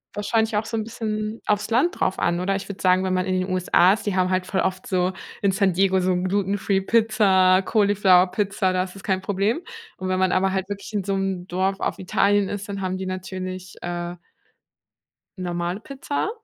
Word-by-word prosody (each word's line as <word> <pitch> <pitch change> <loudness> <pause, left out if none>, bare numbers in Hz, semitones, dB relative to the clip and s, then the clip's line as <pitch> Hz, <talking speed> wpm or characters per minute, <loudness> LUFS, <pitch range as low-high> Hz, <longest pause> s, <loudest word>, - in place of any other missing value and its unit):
wahrscheinlich 220 +1 0
auch 215 - -1
so 225 - -3
'n 220 - -1
bisschen 215 -1 -4
aufs 210 0 +1
Land 260 +10 +2
drauf - - 0
an, 170 0 +1
oder? 195 +2 0
Ich 195 - -5
würde 200 - -7
sagen, 185 0 +3
wenn 185 - 0
man 185 - 0
in 185 -1 0
den 185 - -2
USA 185 0 +4
ist, 220 - -5
die 205 -3 -1
haben 185 0 +2
halt 185 0 0
voll 190 0 -1
oft 185 0 -2
so 185 0 0 0.3
in 200 -1 +3
San 195 -2 +2
Diego 190 +1 +3
so 185 0 +1
glutenfree 195 +1 0
Pizza, 195 -4 +4
Cauliflower 200 -3 +4
Pizza, 195 -2 0
da 185 - +1
ist 185 +1 -9
das 195 - -10
kein 190 -1 0
Problem. 205 - 0 0.4
Und 185 0 -4
wenn 185 - 0
man 185 -1 +2
aber 190 0 +2
halt 190 0 -2
wirklich 205 +2 -6
in 200 -2 -1
so 195 - -1
'm 190 -2 -2
Dorf 190 +2 -1
auf - - -2
Italien 200 +2 +2
ist, 205 +1 -5
dann 200 -1 -4
haben 185 0 -2
die 190 - -5
natürlich, 185 0 -6
äh 175 0 -4 1.2
normale 175 +1 -3
Pizza 275 - -3
190 Hz, 210 wpm, -23 LUFS, 185-205 Hz, 1.2 s, USA